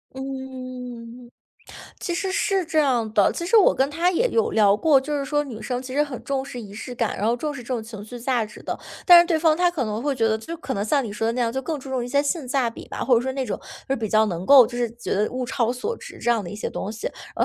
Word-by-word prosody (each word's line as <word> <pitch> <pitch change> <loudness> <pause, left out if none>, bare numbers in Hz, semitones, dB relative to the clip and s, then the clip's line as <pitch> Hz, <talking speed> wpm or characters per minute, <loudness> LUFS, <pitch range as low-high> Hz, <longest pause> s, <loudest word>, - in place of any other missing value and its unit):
嗯。 255 -3 -7 0.7
其 345 - -2
实 380 +2 -2
是 390 -1 +1
这 315 -1 -1
样 250 -7 +2
的。 205 -2 +4
其 340 - -4
实 450 +6 +4
我 415 - +6
跟 270 +2 +1
他 335 +4 +1
也 470 +8 +2
有 455 -1 +1
聊 205 -2 +4
过， 295 +4 +4
就 295 +2 -3
是 275 - -2
说 295 +2 0
女 240 -6 -8
生 250 -1 -3
其 260 0 -7
实 290 - +3
很 285 -5 -5
重 275 -1 -1
视 275 -2 -8
仪 205 -3 -10
式 235 +4 -7
感， 230 -2 -1
然 205 - 0
后 235 +2 +2
重 300 +4 -3
视 265 -4 -8
这 - - -17
种 245 -3 -2
情 220 -2 -9
绪 245 +3 -9
价 240 -2 0
值 210 - -13
的， - - -4 0.3
但 350 -2 +10
是 345 - +2
对 335 -3 +2
方 315 -1 +4
他 355 0 +3
可 315 -7 -2
能 215 +1 -3
会 285 0 0
觉 230 -3 +1
得 220 0 +1
就 330 +10 -7
可 265 -4 -5
能 200 - -1
像 275 +5 +1
你 210 - -5
说 225 +1 -2
的 230 - +1
那 250 - -2
样， 230 -1 +1
就 265 - -2
更 300 +3 -3
注 270 0 -10
重 260 -2 -1
一 - - -6
些 280 +3 +2
性 290 -2 -2
价 255 -3 +1
比 - - -11
吧， - - -4
或 255 - +4
者 230 - +4
说 265 +2 -2
那 265 0 -2
种 215 - -3 0.3
就 270 - +2
比 220 -3 -3
较 215 +1 +4
能 180 -2 -4
够 270 -4 +9
就 240 - -7
是 240 -2 0
觉 235 0 -5
得 210 +2 +1
物 255 0 -3
超 240 -2 0
所 255 - -3
值 - - -11
这 240 - 0
样 230 -3 +2
的 175 - -7
一 205 - -7
些 - - -3
东 200 - -4
西， 220 0 -5 0.3
然 - - +3
255 Hz, 325 characters per minute, -23 LUFS, 230-290 Hz, 0.7 s, 但